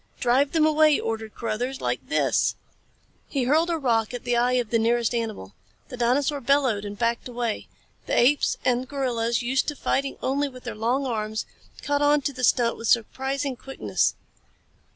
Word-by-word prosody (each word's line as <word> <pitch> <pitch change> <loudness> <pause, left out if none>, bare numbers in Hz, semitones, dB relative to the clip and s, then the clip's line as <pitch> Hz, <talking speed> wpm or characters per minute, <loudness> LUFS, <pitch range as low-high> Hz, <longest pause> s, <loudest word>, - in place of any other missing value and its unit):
"Drive 260 +3 +2
them 320 -2 +4
away!" 310 -1 +4
ordered 220 -1 -4
Carruthers. 245 +4 -3
"Like - - -3
this!" - - +2 0.7
He 275 -3 -1
hurled 310 +7 +2
a 335 - 0
rock 235 -4 0
at 245 - -7
the 245 -1 0
eye 245 +1 +2
of 245 -3 0
the 230 - +3
nearest 235 +1 +1
animal. 220 - -4 0.4
The 250 - -7
dinosaur 275 +4 +1
bellowed 255 -6 +2
and 205 0 -6
backed 235 +3 -1
away. 240 -3 -3 0.4
The - - 0
apes, 280 +4 +3
and 250 +1 +1
gorillas, 240 -4 -1
used 260 +3 0
to 295 - -2
fighting 275 0 -1
only 280 +2 0
with 255 -1 -13
their 240 - -5
long 240 +6 0
arms, 220 -3 -2 0.4
caught 285 0 0
on 290 0 +4
to 280 +1 -2
the 255 -1 -6
stunt 235 -1 +3
with 230 - -5
surprising 265 +4 0
quickness. 270 +2 -1
250 Hz, 175 wpm, -25 LUFS, 230-275 Hz, 0.7 s, them